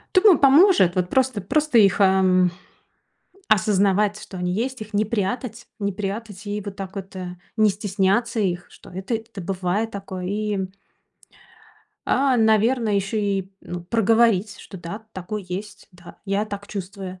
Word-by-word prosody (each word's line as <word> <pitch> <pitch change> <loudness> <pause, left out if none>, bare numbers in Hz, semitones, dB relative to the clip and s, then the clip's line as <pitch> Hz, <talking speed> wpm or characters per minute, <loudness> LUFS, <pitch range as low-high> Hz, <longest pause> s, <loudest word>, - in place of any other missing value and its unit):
Думаю, 375 -1 +7
поможет, 275 - +5
вот, 180 -1 +1
просто 255 -1 +1
просто 300 +6 +2
их, 200 -2 +4
эм, 190 -2 +4 1.0
осознавать, 210 -1 +2
что 190 -3 -9
они 180 0 -1
есть. 245 +5 -2
Их 215 0 -9
не 210 +1 +2
прятать 225 +2 -3
не 200 -2 -1
прятать. 205 +1 -5
И 205 +1 -3
вот 200 -1 -7
так 195 -1 -7
вот, 195 0 -7
э, 180 -1 -6 0.2
не 215 -1 +5
стесняться 205 +3 0
их, 175 -3 -1
что - - -15
это 190 +6 -4
это 220 -2 -6
бывает 190 +4 -1
такое 195 -3 -6
и 210 +1 -2 1.5
А, 265 -1 +3
наверно, 225 +2 +3
ещё 200 +2 -1
и, 195 -2 -1
ну, 175 -1 -7
проговорить, 225 0 +2
что 195 - -11
да, 205 +6 -8
такое 190 +3 -5
есть, 200 +3 -7
да, 175 -1 -15
я 200 +1 0
так 205 -1 -7
чувствую. 190 -2 -7
205 Hz, 155 wpm, -23 LUFS, 190-220 Hz, 1.5 s, Думаю